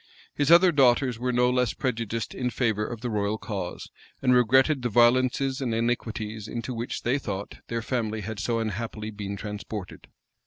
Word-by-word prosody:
His 145 0 0
other 175 +2 +7
daughters 125 -4 +3
were 125 +1 0
no 125 0 +3
less 125 -2 +1
prejudiced 115 -3 -3
in 125 -1 -2
favor 110 -3 0
of 115 -2 -7
the 125 - -2
royal 105 0 0
cause, 95 -5 -5 0.3
and 125 -1 +3
regretted 130 +4 +4
the 120 - -1
violences 130 +4 +3
and 120 -4 -1
iniquities 110 -2 -2
into 120 +3 -4
which, 120 +1 -4
they 130 +4 +1
thought, 100 -6 -5
their 115 -1 -3
family 110 -3 -2
had 105 +1 -5
so 115 +1 0
unhappily 110 0 -3
been 100 -1 -5
transported. 105 -2 -7
115 Hz, 170 wpm, -26 LUFS, 110-125 Hz, 0.3 s, other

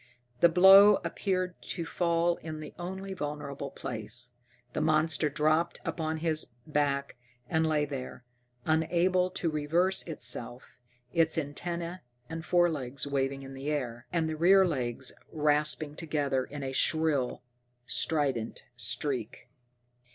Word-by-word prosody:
The 170 - +6
blow 195 +4 +8
appeared 185 -2 -2
to 170 - -4
fall 170 0 +1
in 155 -1 -7
the 155 - -8
only 190 +2 -5
vulnerable 145 -4 -5
place. 120 0 -4 0.4
The - - -1
monster 155 0 +2
dropped 155 +3 +1
upon 160 0 -3
its 155 -6 0
back 140 -3 -1 0.3
and 160 +3 +1
lay 150 -2 +2
there, 130 -3 -7 0.4
unable 175 +3 +2
to 180 -3 -1
reverse 165 +5 +1
itself, 125 -6 -1 0.3
its 165 -1 +2
antenna 170 +4 -3 0.3
and 165 0 -5
forelegs 155 -8 +1
waving 135 -1 -1
in 135 0 -9
the 135 +2 -5
air, 125 -5 -3
and 165 -2 +1
the 160 - -2
rear 190 +4 +6
legs 130 -5 -3 0.2
rasping 150 0 +1
together 145 -5 -1
in 145 0 -7
a 135 - -3
shrill, 145 -3 +1 0.4
strident 135 -9 0
shriek. 125 -2 -3
155 Hz, 125 wpm, -30 LUFS, 140-170 Hz, 0.4 s, blow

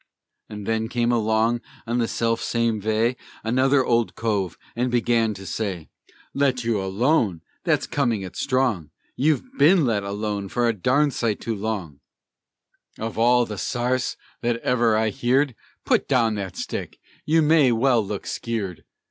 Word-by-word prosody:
Just 105 -1 -7
then 110 0 -1
came 120 -1 +1
along 115 +1 +1 0.2
on 120 +1 -1
the 115 - +1
self 115 0 0
same 115 -2 0
vay, 110 +4 +1 0.3
Another 130 +4 +3
Old 115 -1 +1
Cove, 105 -6 -1 0.2
and 125 +2 0
began 115 -2 +1
for 95 - -10
to - - -9
say 95 -6 -4 0.4
"Let 135 -3 +1
you 115 -3 0
alone! 100 - +1 0.2
That's - - +2
comin' 120 -8 0
it 95 - -8
strong! 125 - 0 0.3
You've 150 +1 +2 0.2
ben 165 +1 +6
let 110 -4 +1
alone 100 0 -3
a 120 -1 +3
darned 130 +8 +2
sight 110 -3 -1
too 115 - -3
long; 100 -9 -4 1.0
Of 110 0 -4
all 120 +1 +4
the 105 -3 -6
sarce 125 +1 -1 0.2
that 120 0 +1
ever 120 -3 +2
I 110 0 +2
heerd! 130 +6 +1 0.3
Put - - +2
down 120 -5 +2
that 100 -3 -5
stick! - - -5 0.3
(You 160 +1 +4
may 150 -4 +5
well 120 0 +3
look 100 0 -5
skeered.) 105 -7 -4
115 Hz, 155 wpm, -23 LUFS, 105-125 Hz, 1.0 s, ben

